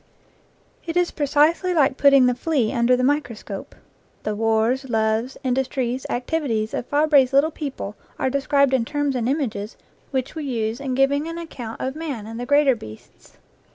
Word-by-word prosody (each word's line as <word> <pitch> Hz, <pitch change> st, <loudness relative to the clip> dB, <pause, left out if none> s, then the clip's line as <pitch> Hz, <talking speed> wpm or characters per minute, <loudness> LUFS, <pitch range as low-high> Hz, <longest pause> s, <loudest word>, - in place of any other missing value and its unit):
It 335 Hz, 0 st, -3 dB
is 355 Hz, -1 st, +2 dB
precisely 310 Hz, +5 st, +2 dB
like 280 Hz, -4 st, +3 dB
putting 275 Hz, -2 st, +6 dB
the 250 Hz, -, +3 dB
flea 265 Hz, -4 st, 0 dB
under 245 Hz, 0 st, +3 dB
the 255 Hz, -, 0 dB
microscope. 245 Hz, -8 st, -2 dB, 0.5 s
The 215 Hz, -, -1 dB
wars, 225 Hz, +4 st, +1 dB
loves, 220 Hz, +2 st, 0 dB
indus 260 Hz, 0 st, 0 dB
tries, 255 Hz, -1 st, -3 dB
activities 245 Hz, -5 st, -1 dB
of -, -, -3 dB
Fabre's 290 Hz, -3 st, +3 dB
little 285 Hz, +4 st, +4 dB
people 275 Hz, -9 st, -6 dB, 0.2 s
are 260 Hz, -, 0 dB
de 280 Hz, +1 st, 0 dB
scribed 280 Hz, -1 st, +2 dB
in 255 Hz, -3 st, +3 dB
terms 290 Hz, +1 st, -1 dB
and 240 Hz, -1 st, 0 dB
images 235 Hz, -7 st, -2 dB, 0.3 s
which 260 Hz, -2 st, -2 dB
we 315 Hz, -2 st, -5 dB
use 230 Hz, -3 st, -2 dB
in 265 Hz, -2 st, -3 dB
giving 280 Hz, +3 st, +2 dB
an 330 Hz, 0 st, -5 dB
account 250 Hz, -9 st, -7 dB
of 265 Hz, +1 st, -3 dB
man 290 Hz, -9 st, -5 dB
and 225 Hz, +1 st, -7 dB
the 245 Hz, -, -5 dB
greater 285 Hz, -1 st, +4 dB
beasts. 110 Hz, -, -14 dB
265 Hz, 175 wpm, -22 LUFS, 235-290 Hz, 0.5 s, putting